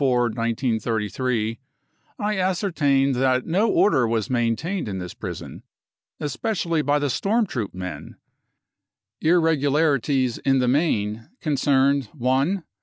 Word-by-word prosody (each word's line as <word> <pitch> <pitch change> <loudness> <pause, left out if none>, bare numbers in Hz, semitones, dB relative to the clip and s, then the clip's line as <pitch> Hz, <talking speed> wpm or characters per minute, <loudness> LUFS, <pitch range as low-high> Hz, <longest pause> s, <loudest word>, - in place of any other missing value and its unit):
4.33 115 -2 0 0.6
I 210 -1 -1
ascertained 165 -8 +1
that 130 0 +1
no 195 +7 +2
order 130 - +3
was 115 0 -1
maintained 125 - -1
in 100 -2 -4
this 90 -2 -6
prison, - - -7 0.6
especially 170 +1 -1
by 145 0 +2
the 145 0 0
storm 215 - +1
troop 115 - -4
men. 90 -4 -7 1.1
Irregularities 145 -5 +2
in 135 -1 +2
the 125 -1 +1
main 115 -6 0
concerned: 140 - +2
" - - -32
1 135 +9 +1
135 Hz, 110 wpm, -23 LUFS, 115-160 Hz, 1.1 s, order